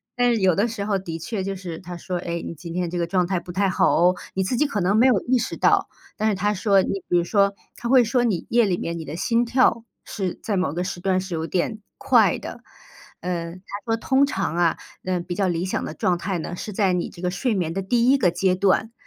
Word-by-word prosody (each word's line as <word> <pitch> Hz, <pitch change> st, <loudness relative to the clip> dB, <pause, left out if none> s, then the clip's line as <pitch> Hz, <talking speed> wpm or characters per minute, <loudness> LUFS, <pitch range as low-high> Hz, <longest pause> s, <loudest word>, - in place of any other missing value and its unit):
但 245 Hz, -1 st, +3 dB
是 225 Hz, -, 0 dB
有 185 Hz, -3 st, +4 dB
的 205 Hz, +4 st, +2 dB
时 225 Hz, -3 st, -4 dB
候 205 Hz, -1 st, +1 dB
的 165 Hz, -3 st, -6 dB
确 190 Hz, +4 st, -4 dB
就 195 Hz, +1 st, -3 dB
是 180 Hz, -4 st, -6 dB
它 180 Hz, -1 st, -8 dB
说： 180 Hz, +1 st, -4 dB
“哎， 170 Hz, 0 st, -3 dB
你 -, -, -5 dB
今 165 Hz, +2 st, -8 dB
天 180 Hz, -1 st, -1 dB
这 175 Hz, -, -4 dB
个 170 Hz, -, 0 dB
状 180 Hz, 0 st, +1 dB
态 185 Hz, -1 st, 0 dB
不 175 Hz, +1 st, -9 dB
太 195 Hz, +2 st, +1 dB
好 185 Hz, -, +3 dB
哦。” 180 Hz, +2 st, +4 dB, 0.2 s
你 190 Hz, -, 0 dB
自 215 Hz, +6 st, -1 dB
己 300 Hz, -, +3 dB
可 250 Hz, -9 st, -2 dB
能 190 Hz, +4 st, +2 dB
没 235 Hz, -, +5 dB
有 240 Hz, -7 st, +4 dB
意 255 Hz, +1 st, +2 dB
识 240 Hz, -, -2 dB
到， -, -, +3 dB, 0.3 s
但 215 Hz, -, +1 dB
是 210 Hz, -, +1 dB
它 205 Hz, +2 st, 0 dB
说 195 Hz, 0 st, +3 dB
你 195 Hz, +1 st, -2 dB
比 -, -, +1 dB
如 175 Hz, -, +2 dB
说， 200 Hz, +2 st, +2 dB, 0.2 s
它 240 Hz, -, -5 dB
会 255 Hz, -1 st, +6 dB
说 240 Hz, +2 st, +1 dB
你 210 Hz, -8 st, 0 dB
夜 235 Hz, -1 st, +4 dB
里 185 Hz, -3 st, 0 dB
面 170 Hz, -1 st, -4 dB
你 160 Hz, -, -6 dB
的 150 Hz, -, -6 dB
心 230 Hz, +7 st, +1 dB
跳 235 Hz, -2 st, +2 dB, 0.2 s
是 190 Hz, -4 st, -3 dB
在 210 Hz, -, -2 dB
某 185 Hz, -6 st, 0 dB
个 175 Hz, +2 st, -2 dB
时 180 Hz, -1 st, -5 dB
段 185 Hz, +1 st, +1 dB
是 185 Hz, -1 st, -5 dB
有 160 Hz, -1 st, -2 dB
点 185 Hz, +6 st, -1 dB, 0.2 s
快 -, -, +4 dB
的。 -, -, -8 dB, 0.6 s
呃， 170 Hz, -2 st, -3 dB
它 185 Hz, -, -13 dB, 0.2 s
说： 225 Hz, -, +1 dB
“通 265 Hz, +4 st, +3 dB
常 195 Hz, -, -2 dB
啊， 170 Hz, -2 st, +2 dB, 0.3 s
呃， 185 Hz, -1 st, -1 dB
比 175 Hz, +1 st, -5 dB
较 195 Hz, +1 st, +1 dB
理 170 Hz, -1 st, -1 dB
想 190 Hz, -, -2 dB
的 -, -, -5 dB
状 175 Hz, +3 st, 0 dB
态 180 Hz, +1 st, -3 dB
呢， 175 Hz, -, -5 dB
是 210 Hz, -, -6 dB
在 195 Hz, -1 st, +2 dB
你 180 Hz, -, -1 dB
这 170 Hz, -, -13 dB
个 180 Hz, -, 0 dB
睡 225 Hz, +6 st, -1 dB
眠 175 Hz, -5 st, -1 dB
的 195 Hz, -, -2 dB
第 235 Hz, +5 st, +2 dB
1 275 Hz, -, +5 dB
个 185 Hz, -9 st, +3 dB
阶 185 Hz, +1 st, +1 dB
段“， 200 Hz, +4 st, +2 dB
190 Hz, 285 characters per minute, -23 LUFS, 175-215 Hz, 0.6 s, 会